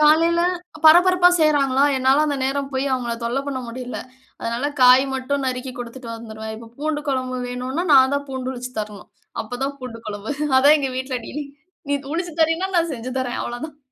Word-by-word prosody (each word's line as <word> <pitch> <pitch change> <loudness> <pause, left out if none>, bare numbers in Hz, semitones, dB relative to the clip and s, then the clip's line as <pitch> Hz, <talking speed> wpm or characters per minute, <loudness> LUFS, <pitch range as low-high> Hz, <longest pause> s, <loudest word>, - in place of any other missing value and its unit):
காலையில 325 +3 +5 0.4
பரபரப்பா 355 +2 +7
செய்றாங்களா! 280 -3 +3
என்னால 265 +3 +3
அந்த 285 -2 -1
நேரம் 275 +1 -1
போய் 265 +1 -1
அவுங்கள 240 -2 -1
தொல்ல 240 +3 -1
பண்ண 275 -2 -3
முடியல. 250 +1 -6 0.4
அதனால 235 +3 -3 0.2
காய் 255 +2 +8
மட்டும் 270 +1 -2
நறுக்கி 255 0 -3
குடுத்துட்டு 245 +1 -8
வந்துருவேன். 220 -1 -7
இப்ப 225 0 -12
பூண்டு 300 0 -2
குழம்பு 255 -1 -1
வேணுனா, 255 +7 -3
நான் 265 0 +6
தான் 285 0 -2
பூண்டு 260 -1 -4
உருச்சு 250 0 -7
தரணும். 210 -1 -8 0.3
அப்ப 245 +3 -7
தான் 280 +1 -3
பூண்டு 240 -3 -7
குழம்பு 210 +2 -5 0.3
அதான் 285 +3 +6
எங்க 270 -2 -2
வீட்ல 260 0 -2
டீலிங் 285 -1 -6 0.4
நீ - - +3 0.2
உரிச்சி 345 0 -2
தரேன்னா, 330 +4 +2
நான் 335 -1 +2
செஞ்சு 250 +1 -6
தரேன் 250 -2 -2
அவ்ள 240 0 -5
தான். 295 -2 -16
260 Hz, 180 wpm, -22 LUFS, 245-290 Hz, 0.4 s, காய்